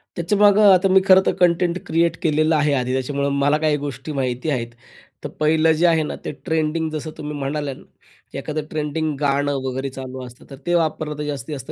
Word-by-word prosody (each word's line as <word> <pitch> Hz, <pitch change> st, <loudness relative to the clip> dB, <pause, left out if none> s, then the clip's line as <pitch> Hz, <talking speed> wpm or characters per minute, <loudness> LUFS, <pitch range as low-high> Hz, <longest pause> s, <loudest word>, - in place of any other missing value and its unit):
त्याच्यामागं, 205 Hz, +3 st, +4 dB
आता 185 Hz, +1 st, +3 dB
मी 190 Hz, 0 st, +5 dB
खरं 190 Hz, 0 st, +7 dB
तर -, -, +2 dB
कंटेंट 175 Hz, -1 st, +2 dB
क्रिएट 165 Hz, +1 st, +1 dB
केलेलं 155 Hz, -1 st, +2 dB
आहे 150 Hz, -1 st, +2 dB
आधी, 125 Hz, -1 st, -1 dB
त्याच्यामुळं 140 Hz, +2 st, -1 dB
मला 145 Hz, +2 st, +3 dB
काही 155 Hz, -1 st, +1 dB
गोष्टी 140 Hz, 0 st, -6 dB
माहिती 130 Hz, +1 st, -2 dB
आहेत. 120 Hz, -5 st, -1 dB, 0.6 s
तर -, -, -4 dB
पहिलं 160 Hz, +1 st, +3 dB
जे 160 Hz, +3 st, +2 dB
आहे 160 Hz, -2 st, +3 dB
ना, 150 Hz, -, -4 dB
ते -, -, -2 dB
ट्रेंडिंग 160 Hz, -1 st, 0 dB
जसं 155 Hz, 0 st, -5 dB
तुम्ही 150 Hz, -1 st, -6 dB
म्हणाल्या 140 Hz, 0 st, -3 dB
ना, -, -, -15 dB, 0.5 s
की -, -, -7 dB
एखादं 155 Hz, 0 st, -4 dB
ट्रेंडिंग 155 Hz, 0 st, -2 dB
गाणं 145 Hz, 0 st, +1 dB
वगैरे 130 Hz, +1 st, -3 dB
चालू 130 Hz, -1 st, -8 dB
असतं, 125 Hz, 0 st, -14 dB
तर 135 Hz, -, -9 dB
ते 175 Hz, -, 0 dB
वापरलं 155 Hz, -2 st, -1 dB
तर 150 Hz, -, -4 dB
जास्तीत 145 Hz, +1 st, -5 dB
जास्त 135 Hz, +3 st, -8 dB
150 Hz, 205 wpm, -21 LUFS, 140-160 Hz, 0.6 s, खरं